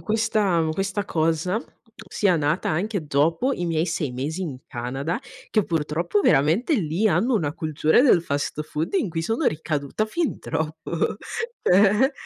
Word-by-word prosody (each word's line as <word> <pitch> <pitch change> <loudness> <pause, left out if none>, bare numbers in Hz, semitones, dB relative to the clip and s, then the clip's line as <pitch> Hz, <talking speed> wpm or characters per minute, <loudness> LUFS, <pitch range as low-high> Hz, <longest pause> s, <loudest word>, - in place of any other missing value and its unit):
questa 215 -6 +1
questa 195 +4 -2
cosa, 165 +4 0 0.5
sia 190 -4 +2
nata 150 +3 0
anche 185 0 -2
dopo 165 - +2
i 175 - -3
miei 165 0 0
6 155 -6 -2
mesi 150 +9 -3
in 145 -7 -5
Canada, 135 - -3 0.3
che 215 -4 +2
purtroppo 165 +4 0
veramente 165 - +3
lì 190 - +1
hanno 205 +8 +2
una 150 -8 0
cultura 155 - +2
del 235 - +5
fast 145 0 -2
food 155 +2 -4
in 195 - +1
cui 165 0 -2
sono 225 - 0
ricaduta 155 +4 -1
fin 330 +7 -2
troppo, 160 +2 -2 0.5
cioè 210 +9 +4
165 Hz, 145 wpm, -24 LUFS, 155-205 Hz, 0.5 s, del